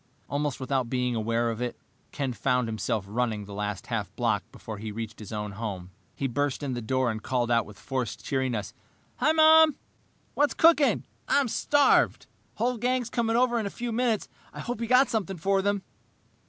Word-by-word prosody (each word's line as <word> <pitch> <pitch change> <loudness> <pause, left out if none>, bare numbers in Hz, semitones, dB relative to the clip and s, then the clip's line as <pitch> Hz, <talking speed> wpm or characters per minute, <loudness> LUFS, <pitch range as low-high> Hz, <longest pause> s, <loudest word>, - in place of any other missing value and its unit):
Almost 145 0 -2
without 130 -2 -1
being 125 -1 0
aware 115 +1 0
of 115 +1 -5
it, 125 -1 -3 0.3
Ken 135 -3 -2
found 125 -1 +1
himself 110 -2 -2
running 110 -1 -1
the 100 - -9
last 105 -1 -3
half - - -3
block - - +1
before 110 -2 -8
he 110 0 -5
reached 110 0 -6
his 105 -1 -9
own 105 -1 -3
home. 100 -4 -5 0.2
He 140 - -3
burst 145 +3 -1
in 135 -2 -2
the 120 - -3
door 130 +1 +1
and 110 0 -5
called 120 0 -1
out 115 -2 +2
with 105 -1 -12
forced 130 -5 -4
cheeriness, 130 -6 -1 0.4
"Hi, 310 - +3
Mom, 315 -1 +7 0.6
what's 290 0 +2
cooking? 320 -3 +4 0.2
I'm 280 -2 +3
starved. 290 +5 +3 0.3
The - - -35
whole 250 0 +1
gang's 245 0 0
coming 230 -2 0
over 240 -1 +3
in 215 - -2
a - - -3
few 240 +3 -4
minutes. 230 -2 0 0.2
I - - -10
hope 240 -2 -4
you've 230 - -3
got 255 +2 +6
something 195 -5 -2
for 195 +4 +1
them." 200 0 0
130 Hz, 195 wpm, -27 LUFS, -, 0.6 s, Mom